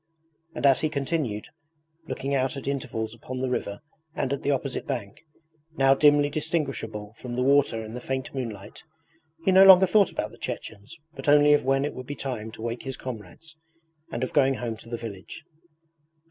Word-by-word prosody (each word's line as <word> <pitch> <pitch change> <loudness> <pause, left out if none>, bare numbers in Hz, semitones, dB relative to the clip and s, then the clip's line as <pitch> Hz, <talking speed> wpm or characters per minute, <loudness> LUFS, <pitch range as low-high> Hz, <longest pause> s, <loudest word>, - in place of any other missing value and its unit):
And - - -2
as 135 -1 +6
he 155 - +1
continued 140 -7 -2 0.6
looking 140 -2 -3
out 135 0 0
at 135 - -7
intervals 115 -5 -3
upon 125 +2 -7
the 130 0 -2
river 100 -5 -3 0.3
and 135 -1 -1
at 140 - -3
the 140 - -2
opposite 135 -1 -2
bank, 120 -6 -5 0.6
now 135 0 +5
dimly 145 +1 +5
distinguishable 135 -10 -3
from 120 -1 -6
the 125 - 0
water 135 -5 +3
in 110 - -9
the 125 - -6
faint 130 +1 -4
moonlight, 110 -7 -6 0.6
he 190 - +4
no 190 +1 +8
longer 190 -1 +9
thought 200 +1 +4
about - - -3
the - - -16
Chechens 105 +10 -7 0.2
but 135 0 -3
only 150 0 +6
of 145 - +2
when 135 +1 +2
it 145 - -3
would 130 -1 -8
be 145 - -5
time 125 -5 -4
to 110 - -9
wake 120 +1 -3
his 135 -1 -6
comrades, 130 +7 -9 0.6
and 120 - -3
of 130 - -3
going 135 -2 +4
home 120 -3 -4
to 115 - -13
the 120 - -3
village. 110 +5 -8
135 Hz, 190 wpm, -26 LUFS, 115-145 Hz, 0.6 s, longer